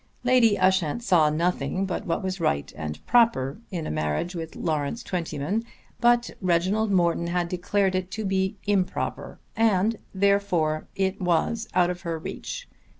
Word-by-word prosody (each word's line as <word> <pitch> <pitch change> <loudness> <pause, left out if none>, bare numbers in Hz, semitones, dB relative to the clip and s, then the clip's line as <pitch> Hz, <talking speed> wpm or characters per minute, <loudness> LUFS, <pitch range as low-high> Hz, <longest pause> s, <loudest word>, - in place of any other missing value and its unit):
Lady 245 -4 +4
Ushant 185 +2 +2
saw 170 -9 +4
nothing 170 +2 0
but 190 - -4
what 170 - -1
was 190 0 -3
right 70 - 0
and 75 0 -6
proper 225 - +3
in 170 -5 -4
a - - -3
marriage 75 - -1
with 165 -2 -6
Lawrence 155 +6 -2
Twentyman, 180 +3 -2 0.4
but 240 0 +3
Reginald 185 +5 +1
Morton 170 -2 +2
had 175 0 0
declared 190 +2 0
it 185 0 -2
to 210 +3 -4
be 190 +1 0
improper, 200 -3 -1 0.2
and 220 -1 +2
therefore 190 -6 +1
it 190 +1 -1
was 180 +6 +1
out 180 -1 +4
of 180 -1 -7
her 170 -3 -3
reach. - - -6
185 Hz, 150 wpm, -25 LUFS, 165-205 Hz, 0.4 s, Lady